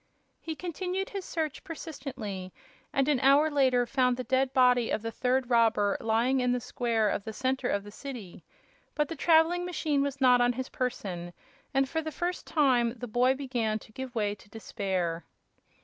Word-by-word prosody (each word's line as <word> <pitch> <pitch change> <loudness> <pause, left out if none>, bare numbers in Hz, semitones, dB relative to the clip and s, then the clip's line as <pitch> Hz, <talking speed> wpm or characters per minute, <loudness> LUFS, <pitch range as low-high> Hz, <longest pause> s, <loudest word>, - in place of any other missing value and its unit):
He 320 -1 -5
continued 365 +3 -3
his 395 -3 -5
search 315 -4 -3
persistently, 260 - -6 0.4
and 270 0 +1
an 290 -4 +3
hour 280 +4 +5
later 260 -4 +3
found 250 0 +1
the 255 - -3
dead 260 +2 +1
body 250 -3 +4
of 220 - -1
the 225 - -3
third 250 +2 0
robber 225 -4 +3
lying 235 +4 +2
in 250 -1 +2
the 250 - 0
square 230 -3 0
in - - -1
the 220 - -5
center 260 +1 -1
of 200 - 0
the 205 - -11
city. 235 -7 -8 0.5
But 300 -1 0
the 330 - -4
traveling 335 +2 +4
machine 315 -5 0
was 280 -1 -2
not 250 -2 +5
on 245 0 +3
his 260 +2 -5
person, 180 -9 -4 0.4
and 270 0 +2
for 320 +4 -2
the 315 0 -5
first 350 +4 -3
time 250 -6 +2
the 245 - -6
boy 250 +4 +3
began 245 -6 -1
to 220 - -15
give 260 +2 -7
way 210 -2 0
to 205 0 -16
despair. 190 -6 -3
255 Hz, 185 wpm, -29 LUFS, 225-285 Hz, 0.5 s, hour